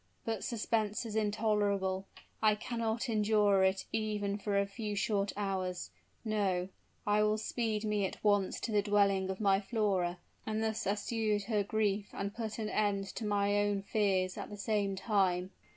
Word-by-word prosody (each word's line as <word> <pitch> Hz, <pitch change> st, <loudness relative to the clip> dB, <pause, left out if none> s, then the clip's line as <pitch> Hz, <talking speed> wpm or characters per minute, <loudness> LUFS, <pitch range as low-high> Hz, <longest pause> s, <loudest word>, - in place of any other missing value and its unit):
But 225 Hz, -3 st, -2 dB
suspense 220 Hz, -1 st, -1 dB
is 220 Hz, -2 st, -5 dB
intolerable, 205 Hz, -3 st, +1 dB, 0.3 s
I 215 Hz, -1 st, +5 dB
cannot 230 Hz, +2 st, -2 dB
endure 210 Hz, -3 st, +3 dB
it 190 Hz, 0 st, +2 dB
even 210 Hz, -2 st, -1 dB
for 205 Hz, 0 st, 0 dB
a 200 Hz, -, +3 dB
few 210 Hz, +1 st, -4 dB
short 200 Hz, 0 st, 0 dB
hours! 185 Hz, -3 st, -2 dB, 0.3 s
No 195 Hz, -4 st, 0 dB, 0.4 s
I 210 Hz, 0 st, +3 dB
will 215 Hz, 0 st, +3 dB
speed 220 Hz, -1 st, -1 dB
me 210 Hz, -2 st, +1 dB
at -, -, -10 dB
once 205 Hz, -2 st, +2 dB
to 230 Hz, -, -2 dB
the 210 Hz, -1 st, +3 dB
dwelling 200 Hz, -2 st, +2 dB
of 190 Hz, -, -3 dB
my 195 Hz, -2 st, +4 dB
Flora, 195 Hz, -5 st, 0 dB, 0.3 s
and 220 Hz, 0 st, -1 dB
thus 220 Hz, -2 st, -1 dB
assuage 210 Hz, +1 st, 0 dB
her 210 Hz, 0 st, +1 dB
grief 205 Hz, -1 st, 0 dB
and 200 Hz, +1 st, -3 dB
put 220 Hz, -2 st, -4 dB
an 220 Hz, -2 st, -2 dB
end 200 Hz, -2 st, 0 dB
to 225 Hz, -, -4 dB
my 205 Hz, 0 st, +2 dB
own 205 Hz, -1 st, +1 dB
fears 190 Hz, -3 st, +1 dB
at -, -, -6 dB
the 205 Hz, -, -8 dB
same 200 Hz, -2 st, 0 dB
time!" 190 Hz, -3 st, +1 dB
205 Hz, 170 wpm, -33 LUFS, 195-215 Hz, 0.4 s, I